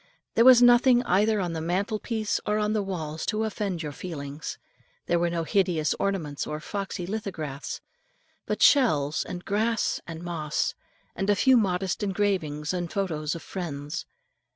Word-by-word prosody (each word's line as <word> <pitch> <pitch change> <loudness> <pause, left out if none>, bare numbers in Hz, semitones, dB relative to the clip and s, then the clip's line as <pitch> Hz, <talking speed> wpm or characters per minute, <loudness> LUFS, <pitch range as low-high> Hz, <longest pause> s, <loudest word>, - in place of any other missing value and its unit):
There 230 - +4
was 250 -1 +9
nothing 245 0 +6
either 210 0 +2
on 175 -3 -2
the 160 - -3
mantle 195 +6 -1
piece 220 -2 -1
or 210 0 +2
on 210 0 +1
the 215 - +1
walls 160 -5 -4
to 215 0 0
offend 200 -6 -2
your 150 - -4
feelings. 145 -2 -6 0.5
There 170 - +2
were 175 0 +1
no 170 -1 -1
hideous 170 -3 +1
ornaments 165 -8 -2
or 150 - -4
foxy 195 +1 -4
lithographs, 175 -9 -5 0.7
but - - 0
shells, 155 - +4
and 180 0 -7
grass, 220 +2 0
and 165 0 -7
moss, 160 -4 -1 0.4
and 195 +1 -2
a 205 - +5
few 260 +6 +5
modest 190 -4 +1
engravings 190 -7 -1
and 175 -2 -3
photo's 160 -6 -2
of 165 - -8
friends. 150 -4 -5
185 Hz, 160 wpm, -27 LUFS, 160-210 Hz, 0.7 s, was